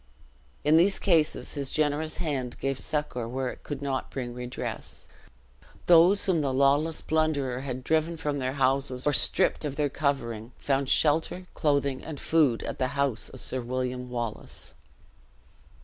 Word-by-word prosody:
In 155 +2 +5
these 190 +4 +4
cases, 165 -5 +1
his 140 -3 -2
generous 155 +1 0
hand 140 -7 -3
gave 135 -1 -1
succor 145 -6 -2
where 130 +1 -2
it - - -9
could 145 -1 -6
not 135 -2 -2
bring 125 -3 -5
redress. 125 0 -5 0.8
Those 175 +4 +6
whom 175 -5 +2
the 140 -2 0
lawless 140 +4 +2
plunderer 145 -5 0
had 130 -2 -5
driven 160 +3 +1
from 150 -3 -2
their 130 0 -1
houses 135 -1 0
or 145 - +3
stripped - - +4
of 145 -2 -3
their 145 -1 +1
covering, 125 -5 -2
found 135 -1 0
shelter, 160 +5 +2
clothing, 140 -3 0
and 155 -4 -7
food 150 -8 +2
at - - -5
the 130 - +2
house 140 -5 0
of - - -8
Sir 130 - -2
William 125 +1 -3
Wallace. 120 -3 -4
140 Hz, 155 wpm, -27 LUFS, 130-155 Hz, 0.8 s, Those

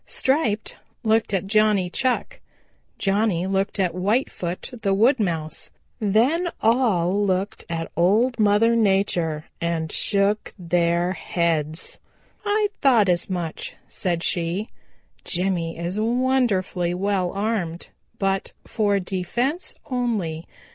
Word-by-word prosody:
Striped 260 -6 0 0.3
looked 220 -1 +2
at 195 -2 0
Johnny 210 -2 +3
Chuck. 260 - -1 0.6
Johnny 195 -3 +1
looked 195 +1 -1
at 185 -3 +2
Whitefoot 185 -2 -1
the 195 -2 +2
Wood 235 +6 +4
Mouse. 165 -6 -2 0.3
Then 245 - +2
all 205 -5 +2
looked 190 +1 -1
at 165 -1 -3
Old 220 +9 +3
Mother 215 +2 +4
Nature 190 -7 +1 0.2
and 165 -2 -1
shook 205 +1 0
their 175 0 +1
heads. 160 -2 -1 0.4
"I 415 0 +1
thought 235 -8 +5
as 175 +1 +1
much," 175 -4 -4
said 175 -2 -2
she. 175 +4 -1 0.5
"Jimmy 175 -2 -1
is 175 +4 -3
wonderfully 225 -7 +1
well 190 -1 0
armed, 195 -5 -2 0.3
but 195 -1 -1
for 205 -3 +1
defense 220 - -2
only. 210 - -2
195 Hz, 110 wpm, -23 LUFS, 175-220 Hz, 0.6 s, thought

